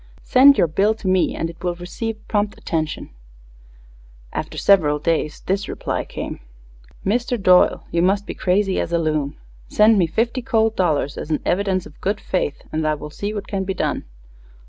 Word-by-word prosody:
Send 275 +2 +6
your - - +4
bill 195 +7 +1
to 220 -3 -7
me 185 -1 +2
and 165 - -2
it 165 0 -11
will 175 -1 -1
receive 215 +5 -6
prompt 205 -1 -1
attention_. 155 -2 -3 1.2
After - - -4
several 155 -7 +4
days 155 -1 -1
this 195 +1 -1
reply - - -3
came: - - -6 0.7
_Mister 240 +4 0
Doyle 185 -2 +4
you 170 - +1
must 195 +3 +2
be - - -5
crazy 190 +1 +1
as - - -2
a 170 - +2
loon. 155 -3 -1 0.3
Send 215 0 +4
me 175 - +3
fifty 230 +9 -1
cold 225 -1 +1
dollars 150 -6 0
as - - -6
an 155 - +1
evvidence 190 -1 0
of 150 - -15
good 200 +2 -1
fayth 180 -6 -2
and 155 0 -1
I 155 - +1
wull 150 0 -9
see 205 +6 -4
what 205 -1 -5
can 195 -2 -2
be 190 0 -3
done. - - -2
185 Hz, 185 wpm, -21 LUFS, 165-210 Hz, 1.2 s, Send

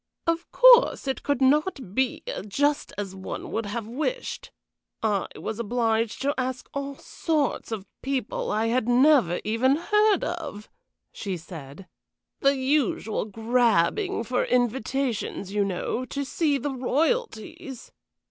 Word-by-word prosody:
"Of 335 0 -1
course - - +6
it 265 - -1
could 285 -2 0
not 280 - +1
be 260 +2 0 0.2
just 290 +8 0
as 200 -2 -4
one 190 0 -6
would 225 -2 -2
have 225 +1 -4
wished. 310 - -3 0.5
I 205 -4 +1
was 220 +1 -5
obliged 230 0 0
to 285 +1 +2
ask 255 0 -3
all 280 0 -4
sorts 300 -4 -2
of 210 -4 -4 0.2
people 265 -4 -2
I 215 +1 +1
had 235 +1 +1
never 245 - +4
even 235 +6 +2
heard 420 +4 +3
of," 320 -11 -5 0.4
she 195 -4 -4
said. 160 0 -10 0.5
"The 275 +1 +3
usual 260 -6 0
grabbing 230 - +1
for 250 +2 0
invitations, 245 -4 -1
you 205 -1 +2
know, 200 +6 -2
to 280 +2 -4
see 290 +1 +1
the 275 +1 -3
Royalties. 265 - -2
255 Hz, 130 wpm, -26 LUFS, 220-285 Hz, 0.5 s, course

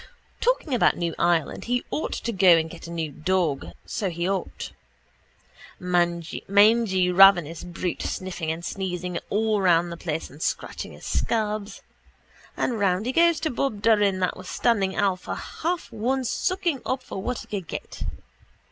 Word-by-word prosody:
Talking 480 - +1
about 245 - +3
new 170 -1 -1
Ireland 170 -3 +1
he 245 +1 0
ought 310 - -2
to 235 - -3
go 185 -4 +6
and 160 0 -1
get 170 -1 -10
a - - -8
new 165 -3 -3
dog 160 -2 0 0.2
so 200 - -2
he 170 +1 -2
ought. 195 -1 -3 1.1
Mangy 175 -2 0 0.7
ravenous 175 -4 +6
brute 175 0 -4
sniffing 180 -4 -3
and 165 +2 -5
sneezing 180 -2 -3
all 215 0 +1
round 175 -2 +3
the 170 - -6
place 160 -1 -3
and 145 +3 -13
scratching - - -3
his - - -12
scabs. 215 -2 -1 0.7
And 235 -3 0
round 195 +1 +1
he 250 - 0
goes 335 +2 +4
to 315 - 0
Bob 235 -5 -2
Doran 205 -4 +4
that 180 - +1
was 185 -1 -10
standing 200 -5 +1
Alf 190 -3 0
a - - -2
half 340 -2 -4
one 250 +4 -1
sucking 345 - -1
up 260 0 -2
for 195 - -6
what 250 +4 -2
he - - -8
could 195 -5 -5
get. - - -7
190 Hz, 165 wpm, -25 LUFS, 170-230 Hz, 1.1 s, go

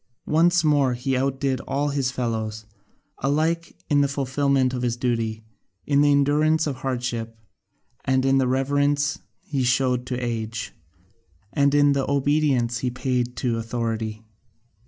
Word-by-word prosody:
Once 170 +2 +3
more 145 -5 +3
he 130 +2 -1
outdid 135 0 0
all 145 +1 0
his 140 -2 0
fellows, 110 -3 -3 0.5
alike 160 +5 0
in 145 -2 +3
the 140 - +3
fulfilment 140 -1 +1
of 125 - -3
his 120 -1 -1
duty, 115 -3 -1 0.4
in 140 0 +3
the 145 0 +4
endurance 150 +3 +3
of 140 -4 -3
hardship, 120 -3 -3 0.7
in 135 +1 +3
the 130 - +2
reverence 145 +2 +1 0.2
he 140 -3 -2
showed 125 0 +1
to 125 0 -2
age, 115 -2 -4 0.8
and 140 -1 +3
the 145 -1 +3
obedience 140 -4 +1
he 125 - -1
paid 125 0 -2
to 120 -2 -1
authority. 115 -1 -3
130 Hz, 135 wpm, -24 LUFS, 120-145 Hz, 0.8 s, the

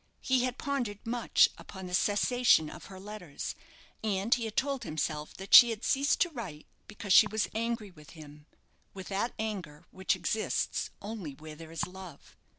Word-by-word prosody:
He 255 -1 +2
had 255 0 -3
pondered 245 -8 -3
much 235 0 +3
upon 190 -1 -9
the 180 - -7
cessation 205 -3 +3
of - - -11
her 190 -1 -11
letters; 195 -7 -6 0.5
and 205 +1 +1
he 235 -2 0
had 220 - -7
told 275 -1 0
himself 155 0 -3
that 195 +1 -7
she 240 - +11
had 225 -1 -4
ceased 280 +1 +2
to 350 - +3
write 185 - -7 0.2
because 205 -2 -2
she 210 - +8
was 215 +1 -1
angry 225 -2 -2
with 150 -4 -16
him 150 0 -13 0.5
with 190 -1 -8
that 205 +5 -2
anger 190 -9 -5
which 190 0 0
exists 185 +5 -1
only 200 -9 -6
where 155 +2 -10
there 160 +1 -11
is 165 - -2
love. 185 -4 -12
205 Hz, 175 wpm, -30 LUFS, 165-230 Hz, 0.5 s, she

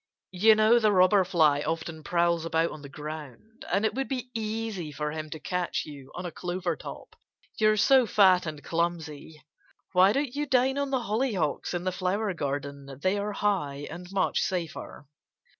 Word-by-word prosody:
"You 215 +4 +5
know 215 +2 +5
the 215 -2 +3
Robber 185 +1 +5
Fly 155 -6 +3
often 160 0 -4
prowls 170 -1 +1
about 165 0 0
on 155 - -9
the 140 - -10
ground. 150 - -9
And 200 +4 +2
it - - +1
would 270 +1 -2
be 255 -2 -4
easy 220 -7 -3
for 150 +1 -3
him 155 0 -5
to 160 - -7
catch 180 +2 -2
you 140 -3 -11
on 180 - -5
a 175 - -4
clover 180 +1 -3
top, - - -10 0.4
you're 215 0 +4
so 260 +2 +5
fat 185 -4 +5
and 150 -2 -6
clumsy.... 160 -3 -3 0.5
Why 185 +1 +5
don't 275 +1 -1
you 295 +1 -2
dine 265 +1 +2
on 280 -1 -1
the 265 -2 0
hollyhocks 210 - -1
in 175 - -2
the 185 - 0
flower 190 +3 -1
garden? 140 -2 -5
They 185 +5 +1
are 205 +1 -3
high, 160 -10 -1
and 175 +1 -8
much 195 - +1
safer." 170 -5 -4
180 Hz, 180 wpm, -27 LUFS, 155-215 Hz, 0.5 s, You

